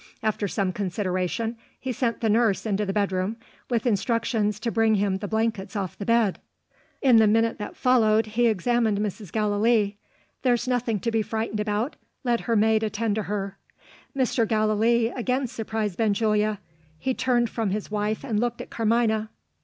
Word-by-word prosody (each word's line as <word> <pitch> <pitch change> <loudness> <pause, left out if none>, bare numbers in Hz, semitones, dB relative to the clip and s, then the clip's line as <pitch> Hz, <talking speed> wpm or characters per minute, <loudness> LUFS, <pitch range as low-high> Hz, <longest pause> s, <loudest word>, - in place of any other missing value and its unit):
After 215 -1 0
some 195 -1 -1
consideration, 190 +4 -2 0.2
he 260 - -3
sent 240 0 -1
the 225 - +1
nurse 225 -2 +2
into 210 -1 0
the - - 0
bedroom, 195 +1 -1 0.3
with 235 -2 0
instructions 220 -1 0
to 230 - -1
bring 225 -1 +3
him 200 -1 +1
the 205 - -4
blankets 220 -2 -1
off 190 -4 -3
the 200 - -7
bed. 230 -4 +2 0.6
In 255 -4 +6
the 220 -1 +6
minute 225 +2 +2
that 210 - -6
followed, 225 -3 +3
he 230 +3 +1
examined 225 +1 +1
Mrs. 205 -2 -4
Gallilee. 210 0 +2 0.4
"There's 245 -2 +1
nothing 245 -4 0
to 230 - -1
be 225 -1 +2
frightened 220 0 -3
about. 210 +5 -1 0.3
Let 240 -2 +1
her 230 - 0
maid 220 +1 +3
attend 220 0 -1
to 215 +1 -1
her." 200 -1 -3 0.6
Mr. 250 -3 +1
Gallilee 220 +2 +2
again 255 +2 -1
surprised 220 -4 -3
Benjulia. 215 -1 +2 0.4
He 260 +11 -1
turned 240 -3 +1
from 225 -3 -1
his 205 +2 -3
wife, 210 +2 -1
and 225 -6 -1
looked 240 0 -1
at - - -8
Carmina. 220 -1 +1
220 Hz, 170 wpm, -25 LUFS, 205-230 Hz, 0.6 s, In